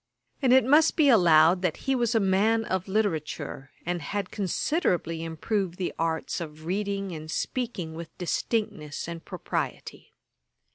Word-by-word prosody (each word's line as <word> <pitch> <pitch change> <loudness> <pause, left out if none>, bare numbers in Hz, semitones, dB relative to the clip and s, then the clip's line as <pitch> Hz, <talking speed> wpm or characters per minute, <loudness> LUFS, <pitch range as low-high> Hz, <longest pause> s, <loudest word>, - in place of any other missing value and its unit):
And 260 -3 +3
it 260 -2 +6
must 300 +4 +5
also - - -32
be 300 -4 +5
allowed 175 -5 +6
that 180 -4 0
he 270 - +2
was 240 -2 +1
a - - +5
man 215 +3 +2
of 190 -1 -2
literature, 160 -9 -2 0.2
and 175 0 -2
had 200 +5 -3
considerably 180 - 0
improved 175 +3 -2
the 185 - -2
arts 165 +1 -1
of 155 -1 -8
reading 195 +1 -2
and 155 -1 -7
speaking 220 -5 -3
with 165 0 -9
distinctness 175 -5 -2
and 170 -1 -6
propriety. - - -5
185 Hz, 150 wpm, -27 LUFS, 165-220 Hz, 0.2 s, it